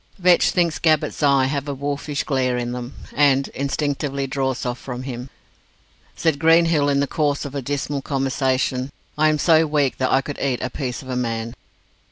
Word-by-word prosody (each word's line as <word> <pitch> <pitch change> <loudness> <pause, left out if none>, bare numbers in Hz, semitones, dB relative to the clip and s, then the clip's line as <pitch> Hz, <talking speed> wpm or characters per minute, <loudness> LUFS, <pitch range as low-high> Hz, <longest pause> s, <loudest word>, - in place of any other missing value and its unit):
Vetch 180 -2 +4
thinks 170 -3 +1
Gabbett's 155 -2 +1
eyes 135 -2 +3
have 140 -1 -2
a 140 - -3
wolfish 145 +1 -3
glare 130 -3 0
in 120 0 -2
them, 125 +1 -6 0.2
and 140 -2 +3
instinctively 140 0 -2
draws 130 -1 -2
off 125 0 -3
from 125 -1 -6
him. 125 -1 -6 0.9
Said 160 -4 0
Greenhill, 165 -2 +4
in 140 0 +2
the - - +2
course 145 -1 -1
of 140 - -6
a 140 - -3
dismal 140 +1 -2
conversation, 135 -1 -1 0.2
"I 155 +1 +3
am 155 - +2
so 160 0 +4
weak 145 -3 0
that 130 - +1
I 135 - +4
could 145 +1 -7
eat 130 -3 -1
a 130 - -3
piece 130 -2 -4
of 130 - -11
a 130 - -2
man." 115 -2 -2
140 Hz, 190 wpm, -22 LUFS, 130-145 Hz, 0.9 s, Vetch